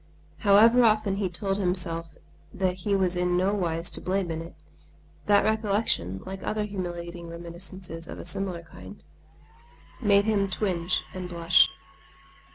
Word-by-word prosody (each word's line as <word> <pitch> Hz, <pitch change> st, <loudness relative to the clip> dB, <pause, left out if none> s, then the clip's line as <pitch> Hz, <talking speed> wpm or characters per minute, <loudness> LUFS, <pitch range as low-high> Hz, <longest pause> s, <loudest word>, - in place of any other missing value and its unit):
However 225 Hz, +4 st, +6 dB
often 215 Hz, -3 st, +3 dB
he 195 Hz, -2 st, -1 dB
told 195 Hz, +2 st, -2 dB
himself 170 Hz, -4 st, -1 dB, 0.4 s
that 185 Hz, -1 st, 0 dB
he 200 Hz, +2 st, 0 dB
was 185 Hz, -2 st, +2 dB
in 180 Hz, 0 st, +1 dB
no 190 Hz, +3 st, +2 dB
wise 170 Hz, -4 st, -1 dB
to -, -, -4 dB
blame 185 Hz, -1 st, -1 dB
in 160 Hz, 0 st, -3 dB
it, 165 Hz, 0 st, -10 dB, 0.7 s
that 205 Hz, -1 st, +5 dB
recollection, 205 Hz, -, 0 dB
like 190 Hz, 0 st, -6 dB
other 215 Hz, 0 st, -1 dB
humiliating 175 Hz, -4 st, -5 dB
reminiscences 170 Hz, 0 st, -8 dB
of -, -, -8 dB
a -, -, -8 dB
similar 185 Hz, -2 st, -3 dB
kind, 95 Hz, -, -13 dB, 1.0 s
made 200 Hz, -2 st, +4 dB
him 200 Hz, -3 st, +1 dB
twinge 180 Hz, -4 st, 0 dB
and 185 Hz, -1 st, -6 dB
blush. 170 Hz, -1 st, +4 dB
185 Hz, 145 wpm, -27 LUFS, 170-200 Hz, 1.0 s, However